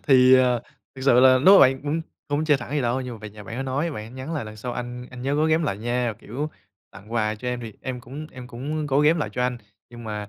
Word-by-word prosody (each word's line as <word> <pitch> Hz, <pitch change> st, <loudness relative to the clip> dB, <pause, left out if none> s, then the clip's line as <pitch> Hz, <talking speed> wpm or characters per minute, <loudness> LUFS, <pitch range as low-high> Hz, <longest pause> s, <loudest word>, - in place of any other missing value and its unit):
Thì, 130 Hz, -2 st, +6 dB
à, 125 Hz, -2 st, +4 dB, 0.3 s
thực 135 Hz, -, -9 dB
sự 125 Hz, -2 st, +6 dB
là 130 Hz, 0 st, +7 dB
lúc 185 Hz, +10 st, +7 dB
mà -, -, +8 dB
bạn, 135 Hz, 0 st, +4 dB
ưm, 150 Hz, +3 st, -1 dB, 0.3 s
không 145 Hz, +2 st, 0 dB
chê 150 Hz, -2 st, +4 dB
thẳng 125 Hz, -, -8 dB
vậy 150 Hz, -, 0 dB
đâu, 120 Hz, +2 st, 0 dB
nhưng 125 Hz, -2 st, -5 dB
mà -, -, -11 dB
về 105 Hz, 0 st, -9 dB
nhà 105 Hz, 0 st, -12 dB
bạn 115 Hz, -, -7 dB
đó 135 Hz, -, -2 dB
nói, 140 Hz, +5 st, -1 dB
bạn 105 Hz, -7 st, -6 dB
ấy 115 Hz, -, -11 dB
nhắn 130 Hz, +5 st, -7 dB
là 145 Hz, -, -3 dB
"Lần 110 Hz, 0 st, -9 dB
sau 120 Hz, +3 st, -5 dB
anh 125 Hz, 0 st, -6 dB
anh 125 Hz, -1 st, -9 dB
nhớ 140 Hz, +2 st, 0 dB
gói 155 Hz, +2 st, +2 dB
ghém 160 Hz, +1 st, +3 dB
lại 100 Hz, -10 st, -2 dB
nha, 120 Hz, 0 st, -1 dB
kiểu, 145 Hz, +8 st, -5 dB, 0.4 s
tặng 105 Hz, +3 st, -13 dB
quà 110 Hz, -2 st, 0 dB
cho 125 Hz, +4 st, -5 dB
em 125 Hz, 0 st, -2 dB
thì 115 Hz, -2 st, -7 dB
em 130 Hz, -1 st, -4 dB
cũng 140 Hz, +6 st, -8 dB
em 125 Hz, -1 st, -9 dB
cũng 145 Hz, +6 st, -4 dB
gói 145 Hz, +1 st, +2 dB
ghém 160 Hz, +3 st, +5 dB
lại 150 Hz, -, -1 dB
cho 125 Hz, -, -1 dB
anh, 125 Hz, -1 st, -1 dB, 0.3 s
nhưng 120 Hz, -1 st, -10 dB
mà 105 Hz, -1 st, -5 dB
125 Hz, 300 wpm, -24 LUFS, 120-145 Hz, 0.4 s, mà